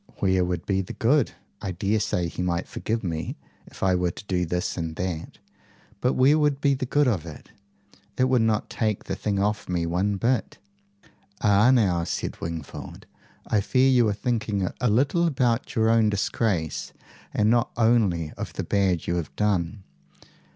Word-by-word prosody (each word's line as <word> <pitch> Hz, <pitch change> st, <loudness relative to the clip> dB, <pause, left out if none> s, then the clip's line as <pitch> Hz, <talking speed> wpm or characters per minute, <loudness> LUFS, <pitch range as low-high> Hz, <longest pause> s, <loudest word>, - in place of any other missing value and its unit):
"Where 95 Hz, -2 st, +2 dB
would 90 Hz, -1 st, -2 dB
be 95 Hz, -1 st, +1 dB
the 95 Hz, -, -7 dB
good? 135 Hz, +3 st, +2 dB, 0.3 s
I 95 Hz, -, -3 dB
daresay 100 Hz, -1 st, 0 dB
he 85 Hz, -, -5 dB
might 90 Hz, -1 st, -1 dB
forgive 110 Hz, 0 st, -3 dB
me, 80 Hz, -4 st, -3 dB, 0.3 s
if -, -, -9 dB
I 95 Hz, -1 st, +3 dB
were 90 Hz, -1 st, +1 dB
to 95 Hz, -, -9 dB
do 90 Hz, -3 st, -1 dB
this 90 Hz, +2 st, -2 dB
and 80 Hz, -2 st, -4 dB
that, 90 Hz, -3 st, -4 dB, 0.6 s
but 125 Hz, +4 st, +1 dB
where 140 Hz, +4 st, +4 dB
would 145 Hz, -2 st, +2 dB
be 140 Hz, -1 st, +3 dB
the 130 Hz, -1 st, -3 dB
good 145 Hz, +2 st, +3 dB
of 100 Hz, -10 st, +1 dB
it? 80 Hz, -, -11 dB, 0.7 s
It 130 Hz, -, +3 dB
would 130 Hz, -2 st, +3 dB
not 110 Hz, -1 st, +1 dB
take 110 Hz, -3 st, -1 dB
the -, -, -4 dB
thing 100 Hz, 0 st, -2 dB
off 105 Hz, 0 st, -1 dB
me 85 Hz, -2 st, 0 dB
one 95 Hz, +5 st, 0 dB
bit." 115 Hz, +1 st, 0 dB, 0.8 s
"Ah! 105 Hz, +3 st, +5 dB
now," 100 Hz, -10 st, +3 dB
said -, -, -4 dB
Wingfold, 80 Hz, -2 st, -7 dB, 0.4 s
"I 105 Hz, -, +1 dB
fear 130 Hz, +5 st, +3 dB
you 120 Hz, -3 st, +4 dB
are -, -, +1 dB
thinking 105 Hz, -4 st, -1 dB
a 125 Hz, -, +3 dB
little 140 Hz, +10 st, +2 dB
about 125 Hz, -5 st, 0 dB
your 110 Hz, -2 st, +3 dB
own 115 Hz, -1 st, +4 dB
disgrace 100 Hz, -5 st, -1 dB, 0.4 s
and 105 Hz, +1 st, +2 dB
not 120 Hz, -1 st, +2 dB
only 105 Hz, -9 st, +2 dB
of -, -, -5 dB
the -, -, -3 dB
bad 95 Hz, -4 st, +1 dB
you 85 Hz, -, -1 dB
have 85 Hz, -, -5 dB
done. 100 Hz, -2 st, 0 dB
105 Hz, 180 wpm, -25 LUFS, 90-120 Hz, 0.8 s, Ah